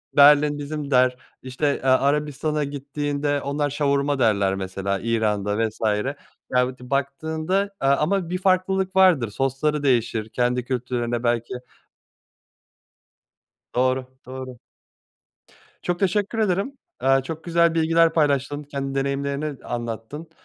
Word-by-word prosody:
Berlin 145 +1 +6
bizim 145 0 -5
der, 125 -1 +4 0.3
işte, 135 +3 -1
eee, - - -8
Arabistan'a 150 +3 +1
gittiğinde 145 0 -2
onlar 145 +1 -1
şavurma 140 0 0
derler 100 -5 +2
mesela 95 +1 -3
İran'da 105 -3 0
vs. 110 - -12 0.8
Ya 125 0 +2
ti 125 0 -13
baktığında, 160 +8 -1
aaa, 135 0 +3
ama 175 +2 0
bir 180 - -1
farklılık 190 0 +1
vardır 175 - +5
sosları 135 +4 -1
değişir 115 -4 +1
kendi 125 +1 0
kültürlerinde 120 -2 -2
belki 120 +1 0 2.2
Doğru, 130 +1 +1 0.2
doğru. 130 -1 -8 1.2
Çok 175 0 -1
teşekkür 205 +3 0
ederim, 215 +6 0 0.2
aaa, 135 +1 +3
çok 160 +4 -7
güzel 170 -1 +3
bilgiler 165 0 +3
paylaştın 145 -2 +1
kendi 140 -1 -5
deneyimlerini 140 +1 -2
anlattın, 120 +7 -5
140 Hz, 115 wpm, -23 LUFS, 125-155 Hz, 2.2 s, Berlin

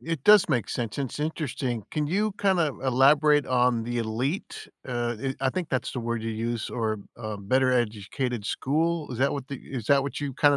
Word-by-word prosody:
it 165 -4 -4
does 210 0 +7
make 120 -8 0
sense, 115 -2 -3
it's 135 -2 -3
interesting. 140 -7 -2
Can 150 -1 -1
you 205 +6 +1
kinda 190 -5 +3 0.2
elaborate 145 +3 +5
on 125 -2 +2
the 120 +1 -3
elite? 120 - -3 0.2
Uh, 120 -2 -2 0.2
i 135 - +1
I - - +2
think 175 +2 -3
that's 130 -4 -1
the 125 - -4
word 115 -1 -2
you 115 - -2
used, 115 +1 -3
or, 110 -2 -1 0.2
uh, 110 -3 -5
better-educated 120 +1 0
school? 160 +7 0
Is 115 - -6
that 135 - +2
what 140 -2 -5
the 140 - -4
is 125 -3 -7
that 140 -1 +4
what 140 - -4
you 140 -3 -3
kinda 145 -1 +4
130 Hz, 200 wpm, -26 LUFS, 115-150 Hz, 0.2 s, does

